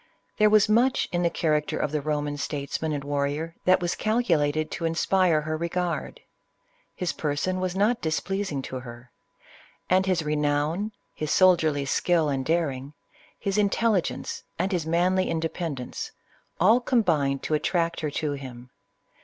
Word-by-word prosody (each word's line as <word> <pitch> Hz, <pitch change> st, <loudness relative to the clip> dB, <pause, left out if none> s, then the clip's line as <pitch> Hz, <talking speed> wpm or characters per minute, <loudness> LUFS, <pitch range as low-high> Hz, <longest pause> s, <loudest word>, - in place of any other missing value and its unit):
There 215 Hz, 0 st, +6 dB
was 215 Hz, -1 st, +5 dB
much 240 Hz, +5 st, +3 dB
in 175 Hz, -, 0 dB
the 170 Hz, -, +3 dB
character 155 Hz, -3 st, 0 dB
of 145 Hz, -, -1 dB
the 155 Hz, -, 0 dB
Eoman 145 Hz, 0 st, -2 dB
statesman 145 Hz, +2 st, -3 dB
and 145 Hz, -2 st, -3 dB
warrior, 145 Hz, +3 st, -2 dB
that 185 Hz, 0 st, +5 dB
was 175 Hz, 0 st, 0 dB
calculated 155 Hz, -10 st, +1 dB
to 165 Hz, -, -3 dB
inspire 165 Hz, 0 st, +2 dB
her 155 Hz, +1 st, -3 dB
regard. 170 Hz, +2 st, -3 dB, 0.7 s
His 180 Hz, -2 st, -2 dB
person 155 Hz, +5 st, -1 dB
was 185 Hz, -1 st, -2 dB
not 215 Hz, +5 st, +2 dB
displeasing 160 Hz, -2 st, -2 dB
to 130 Hz, -, -5 dB
her; 120 Hz, 0 st, -11 dB, 0.8 s
and 190 Hz, +1 st, +4 dB
his 180 Hz, -3 st, +1 dB
re 150 Hz, 0 st, -1 dB
nown, 150 Hz, +7 st, 0 dB, 0.2 s
his 155 Hz, -, -4 dB
soldierly 160 Hz, -7 st, +4 dB
skill 160 Hz, +3 st, +2 dB
and 135 Hz, -2 st, -1 dB
daring, 145 Hz, -3 st, -1 dB, 0.4 s
his 200 Hz, +1 st, -1 dB
intelligence, 205 Hz, -1 st, 0 dB, 0.2 s
and 185 Hz, +4 st, 0 dB
his 170 Hz, -4 st, -1 dB
manly 180 Hz, +3 st, +2 dB
independence, 160 Hz, -5 st, -3 dB, 0.5 s
all 215 Hz, +8 st, +5 dB
combined 160 Hz, -, +1 dB
to -, -, -2 dB
attract 165 Hz, +2 st, 0 dB
her 155 Hz, -, -2 dB
to 150 Hz, +1 st, -2 dB
him. 125 Hz, -3 st, -8 dB
160 Hz, 150 wpm, -26 LUFS, 145-185 Hz, 0.8 s, There